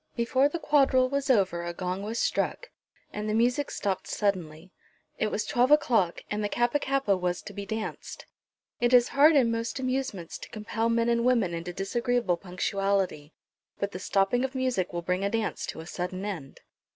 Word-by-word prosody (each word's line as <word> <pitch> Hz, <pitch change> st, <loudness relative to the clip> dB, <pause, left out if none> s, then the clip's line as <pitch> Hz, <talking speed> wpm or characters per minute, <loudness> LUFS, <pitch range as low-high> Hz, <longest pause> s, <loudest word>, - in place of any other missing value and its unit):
Before 260 Hz, +4 st, +2 dB
the 340 Hz, -, -3 dB
quadrille 270 Hz, -5 st, +3 dB
was 280 Hz, 0 st, -2 dB
over 190 Hz, -8 st, +2 dB
a 175 Hz, 0 st, -5 dB
gong 180 Hz, +2 st, -3 dB
was 220 Hz, +3 st, -4 dB
struck, -, -, -1 dB, 0.4 s
and 210 Hz, +1 st, -3 dB
the 215 Hz, -, 0 dB
music 250 Hz, +5 st, +2 dB
stopped 195 Hz, -2 st, -2 dB
suddenly. 180 Hz, -4 st, -2 dB, 0.5 s
It 215 Hz, -, +2 dB
was 210 Hz, -, -2 dB
twelve 245 Hz, +1 st, +2 dB
o'clock, 230 Hz, -, +3 dB
and 210 Hz, 0 st, -1 dB
the 205 Hz, -, -1 dB
Kappa 240 Hz, +6 st, +1 dB
kappa 275 Hz, -8 st, +1 dB
was 180 Hz, -1 st, -2 dB
to -, -, -9 dB
be 200 Hz, -1 st, -6 dB
danced. 220 Hz, 0 st, -5 dB, 0.5 s
It 240 Hz, +1 st, +4 dB
is 245 Hz, 0 st, +5 dB
hard 300 Hz, +3 st, +6 dB
in 245 Hz, -5 st, +4 dB
most 230 Hz, +2 st, -2 dB
amusements 255 Hz, -9 st, -3 dB
to -, -, -10 dB
compel 225 Hz, +1 st, -2 dB
men 230 Hz, 0 st, +2 dB
and 235 Hz, 0 st, +2 dB
women 235 Hz, -8 st, +2 dB
into 170 Hz, +1 st, -4 dB
disagreeable 230 Hz, +1 st, 0 dB
punctuality; 190 Hz, -3 st, -1 dB, 0.4 s
but 200 Hz, 0 st, -2 dB
the 185 Hz, -, -6 dB
stopping 195 Hz, +6 st, +1 dB
of 265 Hz, 0 st, -3 dB
music 255 Hz, -8 st, 0 dB
will 175 Hz, 0 st, -4 dB
bring 180 Hz, +2 st, -1 dB
a 200 Hz, -, +1 dB
dance 225 Hz, 0 st, -2 dB
to 160 Hz, -, -6 dB
a -, -, -10 dB
sudden 185 Hz, +3 st, -4 dB
end. 165 Hz, -10 st, -6 dB
215 Hz, 190 wpm, -28 LUFS, 185-250 Hz, 0.5 s, hard